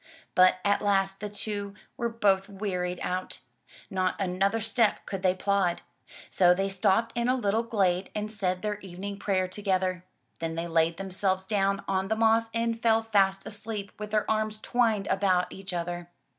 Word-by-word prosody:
But 185 0 +6
at 200 0 +3
last 195 -1 +1
the 210 - -4
two 205 -1 -4 0.2
were 235 - -1
both 200 -4 +2
wearied 180 -3 -3
out. 185 +1 -3 0.5
Not 185 -1 0
another 195 +3 +1
step 225 0 +1
could 195 -2 -4
they 185 -1 +3
plod. 190 -2 0 0.5
So 180 -1 +5
they 195 +1 0
stopped 195 +4 +1
in 235 +1 +1
a 255 - +4
little 220 -3 +1
glade 195 -5 0
and 210 0 -3
said 185 -3 -2
their 210 -1 -2
evening 195 +1 -7
prayer 190 -3 +1
together. 185 -2 -1 0.4
Then 165 0 -3
they 165 +1 -2
laid 165 0 +2
themselves 190 0 -1
down 195 -1 +1
on 190 0 0
the 220 - +1
moss 225 0 +3
and 230 0 -1
fell 225 -1 +3
fast 195 -3 +2
asleep 210 -1 -6
with 210 0 -5
their 215 0 +1
arms 215 0 0
twined 225 -4 +1
about 190 -3 +1
each 195 0 -7
other. 175 0 -4
195 Hz, 170 wpm, -28 LUFS, 185-215 Hz, 0.5 s, But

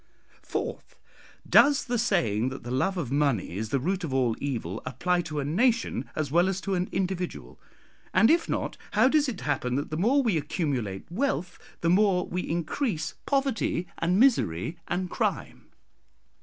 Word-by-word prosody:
"Fourth, - - -5 0.5
Does 285 -1 +5
the 245 -2 -1
saying 130 - +1
that 135 - -8
the 120 - -6
love 185 +10 0
of 145 -8 -3
money 140 - +1
is 110 +2 -3
the 140 - +1
root 185 +7 -1
of 155 - -3
all 125 -4 +1
evil 115 -8 -3
apply 180 +6 0
to 155 -3 -4
a 140 - -2
nation 220 - +1
as 150 -3 -2
well 175 +4 +4
as 190 -1 -2
to 195 - -2
an 180 0 -1
individual? 185 -1 -3 0.5
and 225 - +5
if 330 0 +2
not, - - -2 0.2
how - - +5
does 290 0 +3
it 220 - -6
happen 130 -4 -1
that 145 +2 -3
the 155 - -2
more 255 - +3
we 215 -9 +2
accumulate 135 - -2
wealth, 185 -5 -2 0.2
the 170 - +2
more 190 -1 +3
we 180 - -3
increase 170 - -2
poverty 270 -10 0
and 180 +3 +2
misery 170 - +2
and 180 0 -2
crime? - - -2
175 Hz, 170 wpm, -27 LUFS, 140-205 Hz, 0.5 s, Does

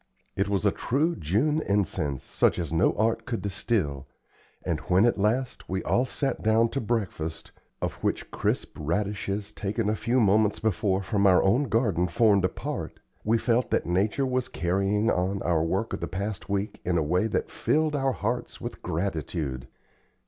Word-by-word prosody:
It 100 +1 0
was 100 0 0
a 100 - +5
true 155 - 0
June 125 - +1
incense, 80 - -1
such - - +1
as 85 -2 -3
no 85 +3 +3
art 110 +1 +1
could 120 -3 -3
distil, 95 - -1 0.6
and 85 -4 0
when, 95 +4 +5
at 120 -3 +2
last, 115 +5 0
we 95 0 -2
all 125 - +2
sat 135 +1 -2
down 110 +1 +3
to 135 - -2
breakfast, 100 -8 -3 0.3
of - - -4
which - - -1
crisp - - -1
radishes 100 +4 -2
taken 105 +1 -2
a - - 0
few 120 +4 +1
moments 105 -1 +3
before 100 -2 0
from 100 +1 +2
our 90 -2 +5
own 120 +9 +3
garden 105 - +1
formed 100 +1 +3
a - - +2
part, - - -5 0.2
we 110 +2 +3
felt 120 +2 +1
that - - +1
nature 100 +10 +1
was 130 -1 0
carrying 100 +5 +1
on 95 +2 0
our 85 -3 +2
work 95 +7 -1
of - - -2
the - - -3
past 100 +1 -4
week 100 +1 -2
in 90 -1 +1
a 80 - +2
way 90 +8 +1
that - - -2
filled 155 0 +1
our 135 -2 +1
hearts 120 +4 -3
with - - -7
gratitude. 80 -7 -3
100 Hz, 180 wpm, -27 LUFS, 90-115 Hz, 0.6 s, a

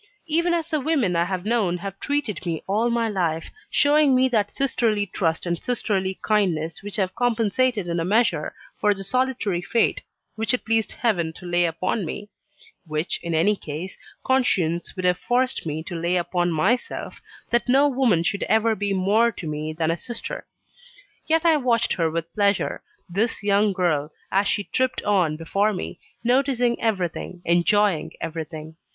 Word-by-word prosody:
Even 335 +2 +1
as 335 -2 0
the 315 -3 0
women 270 - +1
I 170 0 +2
have 185 0 -3
known 210 -6 +1
have 195 +2 -7
treated 285 -10 -2
me 165 -3 -3
all 215 +5 +1
my 235 -1 +1
life 170 -6 -1 0.2
showing 290 -2 +4
me 260 +1 +4
that 210 -4 +1
sisterly 225 -6 0
trust 170 -4 -1
and 170 -1 -2
sisterly 195 -6 -1
kindness 170 -7 0
which 205 0 -7
have 190 -4 0
compensated 235 -2 +1
in 170 0 -1
a - - 0
measure 220 +7 +1 0.2
for 210 -1 +3
the 195 - -6
solitary 245 -5 0
fate 225 +6 +1 0.3
which 225 +2 +1
it - - -8
pleased 225 -1 +1
Heaven 175 -9 0
to 180 - -12
lay 175 0 +2
upon 185 +6 -1
me; 205 +5 -6 0.6
which, 155 +2 -1
in 170 -1 -2
any 190 +7 +3
case, 165 +1 -6 0.3
conscience 180 -11 +1
would 185 -1 -3
have 180 0 +2
forced 250 -6 0
me 155 +1 -3
to 175 +1 -6
lay 170 +2 0
upon 175 0 0
myself 195 +10 -1 0.3
that 240 +1 +1
no 275 +3 +5
woman 250 - +2
should 200 +4 -1
ever 220 +1 +3
be 205 -1 -1
more 205 +5 +3
to - - -8
me 155 0 -3
than 160 0 0
a - - 0
sister. 240 +6 -6 0.8
Yet 325 +1 +2
I 325 -2 +5
watched 235 -4 +1
her 165 -2 +1
with 165 +1 -4
pleasure 200 -1 +1 0.3
this 200 +5 -1
young 205 +1 +3
girl, 160 -5 0 0.2
as 195 +1 +2
she 205 - 0
tripped 255 +4 -1
on 180 -7 +2
before 200 +6 +1
me, 180 - -5 0.2
noticing 245 -1 +2
everything, 185 -4 -2
enjoying 175 +1 +2
everything. 160 -1 -6
200 Hz, 170 wpm, -24 LUFS, 170-235 Hz, 0.8 s, no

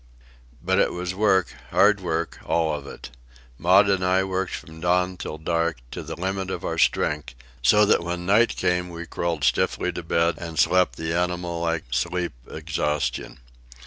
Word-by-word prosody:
But - - +2
it - - +2
was 90 +1 -3
work, 95 -2 +2 0.2
hard 105 -1 +4
work, 85 -2 -2
all 80 -1 +1
of 70 -2 -5
it. - - -10 0.5
Maud 95 +4 +5
and 95 -2 +1
I 95 +1 +3
worked 95 0 -2
from 80 0 -10
dawn 90 +1 +1
till 75 - -6
dark, 85 +1 -1
to - - -5
the - - -6
limit 95 +1 -2
of - - -4
our - - -2
strength, 75 -5 +1 0.3
so 105 +12 +5
that 100 -4 +3
when 90 0 -4
night 105 +5 +3
came 90 0 0
we 85 0 -7
crawled 85 -3 -3
stiffly 70 +7 +1
to 85 - -5
bed 85 -1 +1
and 85 -2 -7
slept 90 +5 +3
the 80 0 -3
animal 90 -1 -1
like 85 -1 -1
sleep 90 +6 -1
of - - -10
exhaustion. 75 -6 -2
85 Hz, 175 wpm, -24 LUFS, 80-90 Hz, 0.5 s, Maud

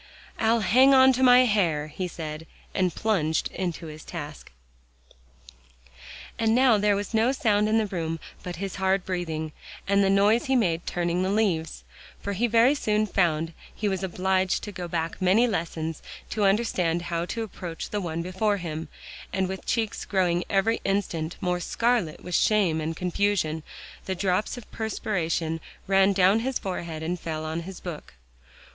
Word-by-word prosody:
"I'll 225 +1 +3
hang 255 +8 +6
on 260 0 +7
to 255 - -1
my 250 -1 +8
hair," 175 -10 +1
he 185 +4 -4
said, 160 -2 -7 0.3
and 185 -3 0
plunged 165 -8 0
into 175 -2 -4
his 155 0 -9
task. 150 -4 -8 1.9
And 225 0 +3
now 250 -4 +5
there 205 0 +3
was 205 +3 -4
no 225 +3 +3
sound 210 -5 +2
in 220 - +3
the 220 - +2
room 165 -4 -3 0.2
but 180 -1 -6
his 195 +3 -5
hard 190 0 +1
breathing, 160 -4 -3 0.4
and 200 0 +3
the 195 - +3
noise 205 +4 +4
he 265 - +1
made 175 -8 +1
turning 175 0 0
the 185 - 0
leaves, 175 - 0 0.4
for 200 - -4
he 230 +5 +1
very 235 +4 +5
soon 215 -6 +1
found 165 -5 0 0.2
he 210 - -2
was 190 -2 -1
obliged 190 0 0
to 205 - -5
go 180 -3 -6
back 165 0 -3
many 190 +6 +4
lessons 165 -6 -3 0.3
to 210 -2 +1
understand 185 -5 +1
how 170 0 -2
to 230 +3 -3
approach 180 -5 -7
the 210 - -1
one 170 -2 -3
before 200 +3 0
him; 160 -3 -5 0.4
and 190 -1 0
with 190 0 -6
cheeks 225 -3 -1
growing 180 -3 +1
every 215 +4 +1
instant 175 -5 -1
more 180 -2 0
scarlet 230 -2 0
with 180 - -7
shame 180 -6 +3
and 160 +1 -3
confusion, 180 -3 0 0.4
the 190 - -2
drops 185 +5 0
of 240 - -11
perspiration 170 -7 -2 0.3
ran 195 0 +4
down 195 +2 +4
his 260 +2 -1
forehead 170 -4 -5
and 175 +2 -2
fell 155 -1 -4
on 160 +1 -3
his 180 +2 -8
book. 160 - -8
190 Hz, 170 wpm, -26 LUFS, 165-210 Hz, 1.9 s, my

